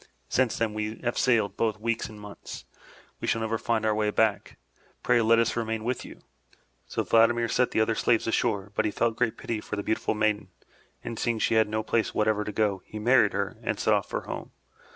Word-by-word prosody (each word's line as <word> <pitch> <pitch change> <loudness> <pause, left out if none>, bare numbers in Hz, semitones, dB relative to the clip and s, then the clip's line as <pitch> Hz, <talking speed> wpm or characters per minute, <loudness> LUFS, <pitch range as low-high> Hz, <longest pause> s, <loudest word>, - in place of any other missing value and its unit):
Since 130 -3 +1
then 110 -2 0
we 110 +1 -4
have 120 0 -1
sailed 115 -5 +2
both 110 -2 0
weeks 115 +1 -2
and 105 -1 -11
months. 105 -1 -9 0.5
We - - -4
shall 115 - +1
never 110 0 -1
find 115 -2 0
our 110 - +3
way 105 0 +1
back. 105 -1 0 0.5
Pray 120 - +4
let 115 +1 +4
us 115 -1 +2
remain 110 -1 -2
with 125 +2 -2
you.*' - - -12 0.7
So - - -2
Vladimir 115 +1 +4
set 125 +2 +2
the - - +1
other 110 +1 +2
slaves 115 +1 +2
ashore, 105 -3 0
but 110 - 0
he - - +2
felt 115 +2 0
great 120 -1 0
pity 110 -2 -4
for - - -5
the 100 - -3
beautiful 110 +1 -1
maiden, 105 -2 0 0.6
and 115 - -5
seeing 120 -2 0
she 110 - +1
had 110 -1 +3
no 110 0 -1
place 115 0 0
whatever 105 0 +2
to 105 - -4
go, 105 -3 0
he 110 - -9
married 115 -1 +4
her - - -2
and - - -2
set - - +3
off - - 0
for - - -2
home. - - -7
110 Hz, 220 wpm, -27 LUFS, 105-115 Hz, 0.7 s, Pray